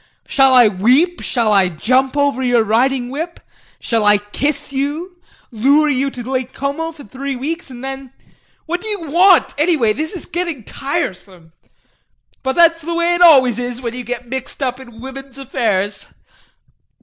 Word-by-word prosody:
Shall 270 -2 +4
I 245 -3 +7
weep, 250 - +2
shall 230 -4 +1
I 190 -2 +4
jump 255 - 0
over 285 -2 +1
your 245 -3 +2
riding 245 +3 +1
whip, 325 +6 -5 0.4
shall 230 -2 0
I 210 0 +5
kiss 275 +8 -3
you, 305 +7 -3 0.3
lure 280 +7 +3
you 275 +1 0
to 250 -2 -8
Lake 260 0 -3
Como 285 +4 -3
for 310 -3 -14
three 270 +5 -5
weeks, 305 +5 -5
and 250 -1 -10
then 270 -1 -7 0.5
what 350 +2 -3
do 440 - -4
you 370 -9 -4
want 360 +2 +5
anyway? 300 -9 +2
This 310 - -4
is 360 - -7
getting 340 -8 -4
tiresome. 190 - -5 0.9
But 265 0 -2
that's 335 -1 +4
the 335 +2 -4
way 340 +1 +1
it 345 - -1
always 260 -9 +6
is 245 0 -4
when 235 -2 -5
you 250 0 -6
get 245 +1 -6
mixed 265 +2 -5
up 255 0 -2
in 240 -3 -13
women's 270 0 -10
affairs. 210 -6 -2
265 Hz, 170 wpm, -17 LUFS, 240-310 Hz, 0.9 s, I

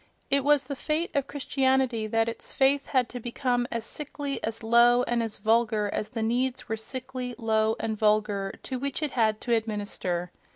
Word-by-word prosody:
It 280 0 +3
was 290 0 +4
the 280 +1 -5
fate 310 +5 -2
of 280 -1 +1
Christianity 265 -5 +1
that 225 +1 +1
its 230 0 -5
faith 275 +1 +3
had 255 -3 +2
to 245 - -6
become 245 +1 -1
as 230 -1 -2
sickly, 290 -1 -5
as 225 +1 -3
low 240 +2 +5
and 240 -1 0
as 225 -2 -3
vulgar 220 -1 +2
as 215 - -2
the 225 0 -3
needs 250 +3 0
were 220 - -1
sickly, 255 +2 -5
low 220 -2 +1
and 220 -1 -2
vulgar 210 -2 +1
to 260 -2 -4
which 280 +3 -3
it 295 - -1
had 220 -3 +2
to 240 - 0
administer. 205 -5 -2
235 Hz, 190 wpm, -27 LUFS, 220-265 Hz, -, low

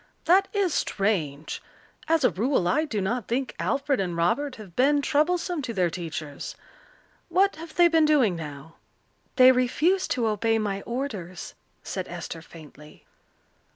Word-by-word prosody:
"That 385 +3 +5
is 395 -5 0
strange. 165 -8 -1 0.5
As 325 -2 +2
a 250 - +4
rule 225 -2 +1
I 305 - +2
do 215 -9 -2
not 225 +3 -2
think 255 +2 -2
Alfred 275 0 0
and 175 -3 -2
Robert 255 +12 0
have 200 -6 -12
been 285 +3 +4
troublesome 335 +3 +1
to 240 -4 -5
their 180 -3 +1
teachers. 160 -4 -6 0.7
What 390 -2 +2
have 320 0 -10
they 350 0 +6
been 325 -2 +4
doing 270 - +3
now?" 150 0 -9 0.6
"They 255 -1 +8
refuse 300 +9 +1
to 240 -3 0
obey 225 +1 +1
my 200 -2 -2
orders," 210 - -5 0.3
said 185 -2 -4
Esther 170 -1 -7
faintly. 150 -2 -15
235 Hz, 150 wpm, -26 LUFS, 175-295 Hz, 0.7 s, They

